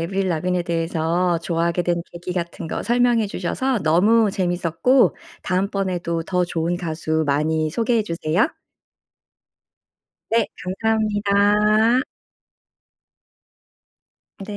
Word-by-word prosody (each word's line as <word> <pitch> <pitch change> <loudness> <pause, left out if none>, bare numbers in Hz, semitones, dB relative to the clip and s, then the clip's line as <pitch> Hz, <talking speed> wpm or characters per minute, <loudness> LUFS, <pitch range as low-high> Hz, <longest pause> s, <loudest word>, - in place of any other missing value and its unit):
에이브릴 190 +3 -1
라빈에 180 +1 0
대해서 170 +1 0
좋아하게 170 +1 -1
된 170 -1 0
계기 175 +1 -6
같은 170 -1 -4
거 - - -4
설명해 240 -2 +2
주셔서 245 +8 -1
너무 205 +7 +4
재미있었고 180 +8 +2 0.3
다음번에도 185 -3 -1
더 180 0 0
좋은 170 0 -2
가수 160 -2 -2
많이 155 +2 +1
소개해 230 +5 +1
주세요. 170 - 0 1.8
네 230 0 +2 0.4
감사합니다. 210 +1 +3 2.4
네. 195 - -7
180 Hz, 240 characters per minute, -21 LUFS, 170-210 Hz, 2.4 s, 너무